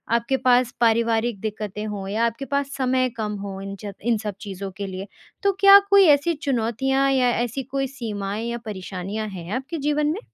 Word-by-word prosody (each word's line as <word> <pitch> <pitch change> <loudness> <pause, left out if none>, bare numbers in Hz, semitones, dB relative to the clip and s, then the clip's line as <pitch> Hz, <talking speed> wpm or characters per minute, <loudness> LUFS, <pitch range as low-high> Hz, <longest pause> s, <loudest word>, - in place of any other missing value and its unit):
आपके 235 +3 +1
पास 250 -1 +3
पारिवारिक 230 -1 +2
दिक्कतें 210 -1 -4
हों 200 -2 -5
या 220 +3 +1
आपके 230 +4 -3
पास 280 0 -1
समय 255 -1 +1
कम 210 -1 -2
हो 195 -1 -6
इन 195 0 -6
चब 205 -2 -7
इन 235 -2 +2
सब 210 -2 -5
चीज़ों 195 -1 -6
के 200 - -3
लिए? 190 +1 -6 0.4
तो 400 - +4
क्या 395 0 +10
कोई 400 -1 +7
ऐसी 295 +3 +4
चुनौतियाँ 270 -1 0
या 255 -2 +3
ऐसी 240 +3 -2
कोई 270 +1 -2
सीमाएँ 215 -4 -4
या 235 - -3
परेशानियाँ 200 +1 -5
हैं 180 -2 -8
आपके 270 +6 -4
जीवन 295 0 0
में? 320 +7 -1
235 Hz, 190 wpm, -23 LUFS, 205-270 Hz, 0.4 s, क्या